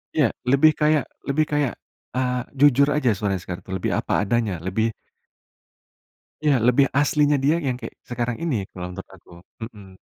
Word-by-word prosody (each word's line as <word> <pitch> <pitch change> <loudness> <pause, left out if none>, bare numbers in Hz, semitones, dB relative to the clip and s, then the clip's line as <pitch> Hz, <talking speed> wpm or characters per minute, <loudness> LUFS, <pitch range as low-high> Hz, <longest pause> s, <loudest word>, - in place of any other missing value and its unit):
iya, - - +3 0.2
lebih 140 +4 +5
kayak 150 -1 +3 0.2
lebih 150 +3 +2
kayak 145 -4 +1 0.4
eee, 125 -1 0 0.2
jujur 140 0 +5
aja 150 -5 +2
suaranya 100 -3 -1
sekarang 90 -1 -7
tuh, 95 - -4
lebih 95 - -2
apa - - 0
adanya, 110 -2 0
lebih 110 +5 -1 1.5
iya 150 -2 +4
lebih 125 +3 +5
aslinya 145 0 +3
dia 150 +3 +4
yang 130 - 0
kek, 115 - -7 0.2
sekarang 120 -1 -2
ini 160 -6 0 0.2
kalau 90 -1 -6
menurut 95 +1 -9
aku. 90 - -23 0.3
Mhm. 100 -5 -11
125 Hz, 160 wpm, -23 LUFS, 100-145 Hz, 1.5 s, lebih